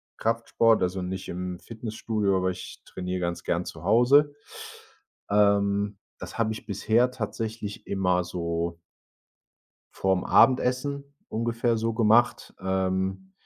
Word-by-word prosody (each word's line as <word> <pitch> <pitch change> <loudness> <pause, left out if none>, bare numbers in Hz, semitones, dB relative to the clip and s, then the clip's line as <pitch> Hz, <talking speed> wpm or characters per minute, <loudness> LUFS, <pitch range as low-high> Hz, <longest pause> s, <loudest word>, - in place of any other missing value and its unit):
Kraftsport, 115 0 +2
also 90 +1 -1
nicht 95 +1 -5
im 90 0 -5
Fitnessstudio, 110 -3 -2
aber 95 0 +1
ich 95 0 -9
trainiere 90 0 -4
ganz 85 -1 -3
gern 85 +1 -1
zu 80 - -9
Hause. 130 +9 +5 1.0
Ähm, 100 0 +2 0.2
das - - -8
habe 110 -1 +1
ich 110 - -9
bisher 115 +4 +2
tatsächlich 110 -3 -5
immer 90 -2 +1
so 85 -1 -3 1.1
vorm 95 -1 +1
Abendessen 130 +2 +3 0.3
ungefähr 115 +1 0
so 115 0 -1
gemacht, 115 +1 +3
ähm. 95 0 -1
100 Hz, 115 wpm, -26 LUFS, 95-115 Hz, 1.1 s, Hause